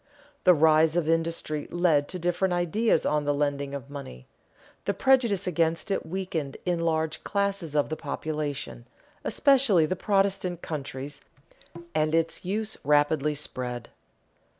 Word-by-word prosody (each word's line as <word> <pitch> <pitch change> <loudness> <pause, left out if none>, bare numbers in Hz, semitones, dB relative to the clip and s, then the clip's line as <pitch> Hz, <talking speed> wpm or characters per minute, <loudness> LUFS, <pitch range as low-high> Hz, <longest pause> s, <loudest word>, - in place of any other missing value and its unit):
The 180 - +7
rise 160 +1 +4
of 175 -3 +1
industry 165 -2 -1
led 165 -5 +2
to 185 - -4
different 175 +1 0
ideas 175 +2 +1
on 150 0 +1
the 145 0 0
lending 140 -1 -1
of 140 0 -8
money; 100 - -9 0.6
the 200 - 0
prejudice 235 -7 +3
against 165 +1 0
it 195 - -1
weakened 165 -6 -3
in 175 -2 0
large 160 -1 -1
classes 200 -6 -1
of 145 - +2
the 155 - -2
population, 145 - -4 0.4
especially 260 - +4
in 180 +4 0
Protestant 195 -3 0
countries, 140 -2 -6 0.7
and 155 0 +1
its 165 0 0
use 210 +4 -1
rapidly 150 +1 +2
spread. 125 -4 -4
160 Hz, 135 wpm, -27 LUFS, 145-185 Hz, 0.7 s, The